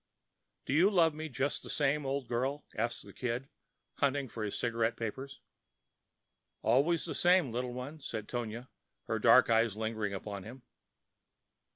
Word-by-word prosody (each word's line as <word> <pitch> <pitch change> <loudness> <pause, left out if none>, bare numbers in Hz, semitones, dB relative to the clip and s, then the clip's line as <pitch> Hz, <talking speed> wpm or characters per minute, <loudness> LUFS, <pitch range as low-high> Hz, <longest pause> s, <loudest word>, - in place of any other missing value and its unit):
"Do - - -1
you 170 +7 +6
love 170 -6 +4
me 155 +1 -5
just 140 +2 -1
the - - -10
same, 145 -1 +1
old 135 -2 -2
girl?" 130 +5 -1
asked 115 +2 -2
the - - -12
Kid, 125 +2 -3 0.5
hunting 140 -1 +1
for 110 - -7
his 105 -2 -2
cigarette 115 -1 0
papers. 130 +5 -5 1.2
"Always 145 +8 +3
the - - -4
same, 175 -7 +4
little 125 +1 -2
one," 135 +5 -6
said 110 -6 -5
Tonia, 120 +1 -4 0.4
her - - -1
dark - - +6
eyes 115 -2 +3
lingering 110 -2 -2
upon 100 0 -5
him. 120 +6 -11
125 Hz, 155 wpm, -32 LUFS, 115-140 Hz, 1.2 s, you